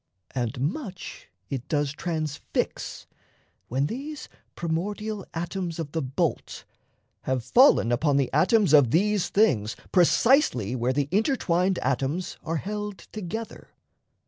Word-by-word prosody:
And 125 0 -2
much 185 - -4 0.2
it 130 -3 -4
does 145 -2 0
transfix, 155 -2 -3 0.6
When 135 +4 0
these 285 - -5 0.3
primordial 200 +5 -3
atoms 175 0 -3
of 160 -4 -5
the 160 - -1
bolt 130 -1 -2 0.6
Have 130 -2 -1
fallen 250 - +5
upon 140 +3 +2
the 135 -2 0
atoms 185 +3 +4
of 145 -6 +7
these 195 - +2
things 115 - +2 0.2
Precisely 180 - +3
where 125 +1 0
the 140 +1 0
intertwined 190 - +1
atoms 135 +7 -1
Are 165 +1 -2
held 210 +3 -4
together. 215 +2 -6
165 Hz, 120 wpm, -26 LUFS, 135-210 Hz, 0.6 s, of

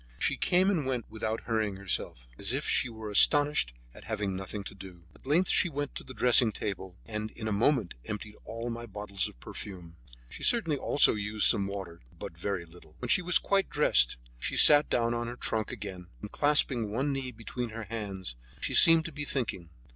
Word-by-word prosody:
She - - 0
came 185 +3 +2
and 155 -9 -1
went 125 -4 -2
without 110 0 -3
hurrying 110 -3 -2
herself, 90 -10 -3
as - - 0
if - - -2
she 130 - +1
were 110 -2 -8
astonished 145 - +4 0.2
at - - -14
having 100 -2 -3
nothing 95 +2 -5
to - - -9
do. 95 -3 -13
At - - -19
length 170 +6 +2
she 175 - +3
went 145 -1 -4
to - - -7
the 130 - -11
dressing 120 -2 +4
table, 95 -3 -5
and 105 -1 -5
in 110 0 -7
a - - -2
moment 110 -1 +1
emptied 105 0 -6
all 115 +1 -6
my 120 0 -7
bottles 105 -2 -2
of - - -18
perfume. 90 - -9 0.3
She - - -11
certainly 215 -11 +3
also 145 - +4
used 105 0 -1
some 100 -4 +4
water, 95 -4 -7 0.2
but - - -8
very 90 +1 -4
little. 80 -2 -18
When 125 - -6
she 180 - +3
was 180 -1 +3
quite 195 -1 0
dressed, 105 - +3 0.2
she - - -2
sat 145 0 +7
down 115 -1 +1
on 120 0 -3
her 120 - -6
trunk 110 -3 -3
again, 95 -5 -8
and 105 - -9
clasping 140 -6 +4
one 135 +7 -1
knee 135 -1 -3
between 120 +1 -6
her 115 +1 -7
hands, 100 - -6 0.2
she - - -3
seemed 165 -1 +7
to 170 - -6
be 150 0 -5
thinking. 115 - -3
110 Hz, 205 wpm, -29 LUFS, 100-130 Hz, 0.3 s, sat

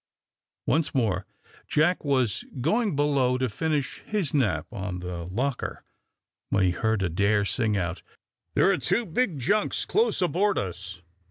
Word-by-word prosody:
Once 155 +1 +1
more 100 -7 +1 0.4
Jack 165 +5 +2
was 130 -8 +1 0.2
going 205 - +1
below 140 -3 +2
to 130 0 0
finish 150 +4 -1
his 205 -9 -2
nap 130 -10 +1
on 95 -4 -4
the 90 -1 -5
locker, 125 +8 -2 0.7
when 100 -1 +2
he 90 - +3
heard 110 +3 0
Adair 100 +4 +2
sing 110 -1 0
out, 90 -1 -2 0.5
"There - - +5
are - - +2
two 235 - +1
big 185 - 0
junks 205 - +1
close 450 +3 +2
aboard 190 +3 +2
us." 90 -1 -5
125 Hz, 145 wpm, -26 LUFS, 95-155 Hz, 0.7 s, There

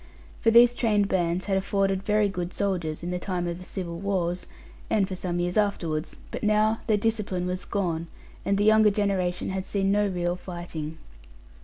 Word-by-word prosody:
For 225 - +3
these 235 +1 +7
trained 210 -4 +2
bands 175 0 0
had 195 -2 +1
afforded 195 0 0
very 210 +1 +2
good 180 -2 -4
soldiers, 175 -6 -1
in 175 - -3
the 180 - -2
time 180 -1 -2
of 170 0 -3
the - - -9
civil 170 -2 -5
wars, 185 -3 -1 0.4
and 200 -3 +2
for 190 - -5
some 175 -1 -2
years 175 +2 -1
afterwards; 170 -7 -1
but - - -5
now 215 +1 +3
their 215 -2 +3
discipline 205 -4 -1
was 180 +1 -3
gone; 170 -5 -2 0.4
and 200 - +1
the 205 - +2
younger 215 0 +6
generation 195 -3 0
had 190 0 -2
seen 195 -1 +1
no 205 0 +3
real 175 -2 -1
fighting. 175 -4 -6
190 Hz, 185 wpm, -26 LUFS, 175-205 Hz, 0.4 s, these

